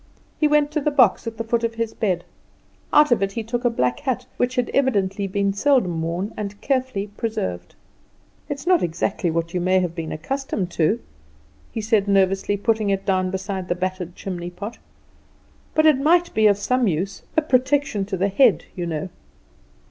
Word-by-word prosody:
He 305 - +4
went 295 0 +3
to 305 0 -1
the 300 - +1
box 250 -6 +3
at 225 -1 -5
the 230 - -2
foot 230 +1 0
of 230 0 -1
his 230 -1 -2
bed; 185 -6 -1 0.7
out 300 -2 +5
of 240 - +3
it 195 0 0
he 230 - -3
took 240 +3 -3
a 240 - +4
black 125 - 0
hat, 255 -1 -2
which 250 +1 0
had 250 -1 0
evidently 200 -7 +1
been 200 +1 0
seldom 200 - +2
worn 170 +5 -3
and 205 -1 -5
carefully 260 -7 -1
preserved. 95 - -4 0.7
"It's 280 +1 -5
not 360 -1 +4
exactly 175 +2 -1
what 165 +1 -2
you 180 - 0
may 185 +1 +3
have 180 -2 -1
been 165 -2 -5
accustomed 205 - -3
to," 170 +9 +1 0.7
he 225 - -3
said 210 -2 +2
nervously, 195 0 +2
putting 215 0 +1
it 195 0 -1
down 185 -2 +1
beside 190 0 -4
the 175 - 0
battered 185 -1 -4
chimneypot, 180 +4 -6 1.0
"but 310 - +4
it 305 -4 +5
might 345 +4 +3
be 220 0 +4
of 200 -1 +4
some 250 +3 +1
use 190 +3 -2 0.2
a 315 - +4
protection 260 -5 +1
to 190 -1 -3
the 195 +3 +1
head, 215 - +4
you 175 -2 -3
know." 165 +3 -3
205 Hz, 185 wpm, -22 LUFS, 185-250 Hz, 1.0 s, out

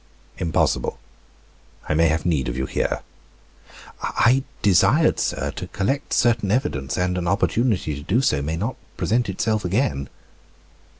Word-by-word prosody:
"Impossible, 85 -4 0 0.9
I - - +1
may 80 +2 +4
have 80 +1 0
need 75 -8 +1
of - - -4
you 65 - -1
here." - - -2 1.0
"I 130 +3 +3 0.2
desired, 95 -5 +4
sir, - - -1
to - - -7
collect 135 +9 -2
certain 115 -4 +2
evidence 75 - -1
and 90 0 0
an 85 - -3
opportunity 100 -2 +1
to 70 - -6
do 100 +11 +1
so 75 - +1
may 80 +3 -2
not 110 +9 -3 0.2
present 115 +1 +1
itself 110 +3 0
again." 90 - 0
90 Hz, 140 wpm, -23 LUFS, 80-115 Hz, 1.0 s, may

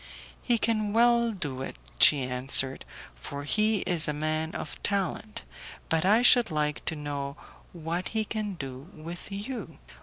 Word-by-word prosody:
"He 240 - +1
can 215 -2 0
well 235 0 +4
do 145 -10 -5
it," - - -6 0.2
she 145 -3 +7
answered, 130 +1 +2 0.3
"for 140 - -7
he 215 +7 +1
is 170 -3 +4
a 150 - 0
man 155 +1 -2
of - - -6
talent; 205 +3 -3 0.5
but 160 +1 +1
I 215 +5 +4
should 245 -2 +6
like 150 -2 -2
to 160 - -1
know 140 -2 -5 0.3
what 170 +1 -4
he 220 -1 -1
can 210 -2 -4
do 135 0 -8
with 170 +5 -8
you?" 205 -3 -6
170 Hz, 155 wpm, -27 LUFS, 145-215 Hz, 0.5 s, she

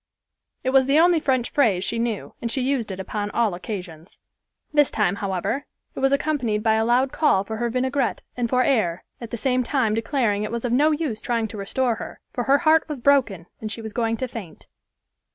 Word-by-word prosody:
It 260 - 0
was 265 -1 +4
the 280 +2 +4
only 345 0 +5
French 260 -5 0
phrase 225 - +2
she 230 +3 -2
knew, 230 -3 -3
and 235 - -2
she 265 - -1
used 255 -4 0
it 190 - -6
upon 205 +2 -3
all 225 -3 +1
occasions. 180 -3 -7 0.6
This 295 -2 +4
time, 200 -2 0
however, 200 +8 -2 0.3
it - - -7
was 270 0 +2
accompanied 270 -7 0
by 220 -1 +3
a 220 0 +2
loud 250 +3 +2
call 245 -11 +2
for 220 +2 -5
her 235 +1 -1
vineagrette 260 +3 -1
and 240 -2 -1
for 255 +1 +3
air, 185 -11 +1 0.2
at 235 - -7
the 235 - -4
same 255 +2 +1
time 250 -4 +1
declaring 225 -2 0
it 210 - -3
was 235 +1 -3
of 240 - -1
no 295 +5 +4
use 295 -8 -2
trying 230 -2 -1
to 215 - -8
restore 230 +4 -1
her, - - -8
for 245 - -2
her 275 +1 +5
heart 320 0 +3
was 295 -3 -4
broken 240 -10 +2
and 215 -1 -5
she 225 - -5
was 220 -1 -6
going 230 -1 0
to 255 - -2
faint. 220 -9 -9
235 Hz, 220 wpm, -23 LUFS, 210-270 Hz, 0.6 s, only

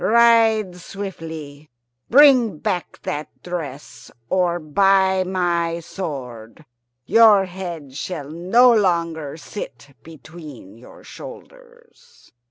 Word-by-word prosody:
Ride 225 -4 +4
swiftly. 160 -6 -8 0.4
Bring 255 - +5
back 180 0 -4
that 150 +1 -4 0.2
dress, 145 -9 -7 0.2
or, 180 -2 +1
by 190 +4 +2
my 170 -2 -1
sword, 135 - -8 0.4
your 215 - +6
head 175 -7 -8
shall 150 -2 -6
no 225 +10 +4
longer 170 -7 0
sit 145 - -9
between 155 - -13
your 120 +2 -16
shoulders!" 485 -1 -15
175 Hz, 90 wpm, -21 LUFS, 155-205 Hz, 0.4 s, your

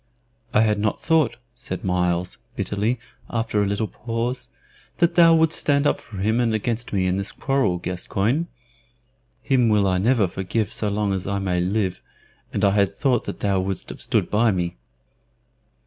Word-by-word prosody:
"I 105 - +4
had 105 -2 +2
not 105 0 0
thought," 160 -6 +2 0.2
said 120 0 -6
Myles, 90 -1 0 0.2
bitterly, 105 +5 -1 0.3
after 115 -2 0
a 100 - +1
little 100 +2 0
pause, 120 +3 -3 0.5
"that 170 - +3
thou 165 -1 +7
wouldst 160 -1 +3
stand 140 0 +2
up - - +1
for 105 - -11
him 110 +5 +1
and 115 -2 +2
against 115 +2 -2
me 95 -2 +1
in 90 0 +1
this 100 +1 -2
quarrel, 135 -10 0
Gascoyne. 100 - -1 1.0
Him 125 -4 +3
will 105 -2 +3
I 90 -1 +1
never 110 0 +3
forgive 95 +4 -2
so 105 - 0
long 100 -1 0
as 95 -1 -3
I 100 0 -1
may 95 -2 0
live, 95 +1 -1 0.5
and 100 - -2
I 100 - +4
had 100 -1 +2
thought 125 +3 0
that - - -6
thou 100 -2 +1
wouldst 95 0 -3
have - - -8
stood - - 0
by 110 +2 +3
me." 90 -5 -2
105 Hz, 180 wpm, -23 LUFS, 95-120 Hz, 1.0 s, thou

